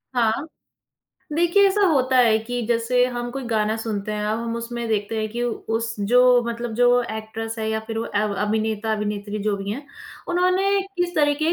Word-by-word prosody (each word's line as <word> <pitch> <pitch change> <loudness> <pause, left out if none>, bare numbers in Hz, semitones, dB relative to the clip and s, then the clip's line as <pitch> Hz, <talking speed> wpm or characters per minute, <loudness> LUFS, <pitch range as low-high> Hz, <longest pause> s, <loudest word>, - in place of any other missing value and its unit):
हाँ। 235 +6 +1 0.9
देखिए 345 +5 +4
ऐसा 410 +2 +1
होता 260 -4 +2
है 230 -3 +5
कि 245 +2 -4
जैसे 240 +1 +2
हम 240 -1 -4
कोई 270 0 -5
गाना 215 -1 +1
सुनते 215 -2 -3
हैं, 210 0 -2
अब 220 +2 -1
हम 230 0 -3
उसमें 235 0 -4
देखते 215 0 -1
हैं 215 - -1
कि 240 +1 -2
उ 240 - 0 0.2
उस 230 0 -2
जो 245 +4 +5
मतलब 235 -1 -4
जो 245 0 +4 0.3
एक्ट्रेस 225 +1 -5
है 220 - -2
या 220 0 0
फिर 225 -1 -4
वो 225 - -2
एव 210 0 +1
अभिनेता-अभिनेत्री 210 -1 -2
जो 210 -1 +1
भी 195 0 -5
हैं, 280 +6 -6 0.4
उन्होंने 370 +3 +2 0.2
किस 350 0 -1
तरीके 295 0 +2
230 Hz, 185 wpm, -23 LUFS, 220-255 Hz, 0.9 s, है